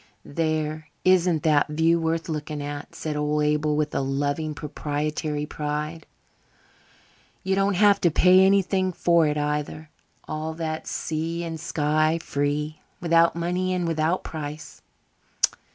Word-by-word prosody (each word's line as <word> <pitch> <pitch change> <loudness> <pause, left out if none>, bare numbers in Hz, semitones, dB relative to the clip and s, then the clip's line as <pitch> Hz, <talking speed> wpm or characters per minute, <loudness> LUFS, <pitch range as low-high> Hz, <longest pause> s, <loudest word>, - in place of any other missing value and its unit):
"There, 155 0 -2 0.2
isn't 180 -4 +3
that 150 -2 +3
view 160 +2 +2
worth 165 0 -1
looking 150 -1 -4
at?" 145 0 -6
said 155 -1 -4
old 150 0 0
Abel, 150 0 +1
with 150 0 -1
a - - 0
loving, 145 +3 -1
proprietary 150 0 -3
pride. 150 +2 -4 1.4
"You 190 - 0
don't 195 0 +2
have 200 +1 +4
to 175 - +4
pay 180 +3 +5
anything 190 -1 +2
for 170 -2 +3
it, 150 0 -1
either. 150 +1 -3 0.4
All 155 +1 -4
that 160 -1 -4
sea 165 +2 -3
and 165 -1 -5
sky 155 -1 +1
free 150 0 -2 0.2
'without 170 -1 +3
money 180 +2 -1
and 175 -2 -1
without 165 +2 0
price'. 155 -1 -7
155 Hz, 135 wpm, -25 LUFS, 150-170 Hz, 1.4 s, pay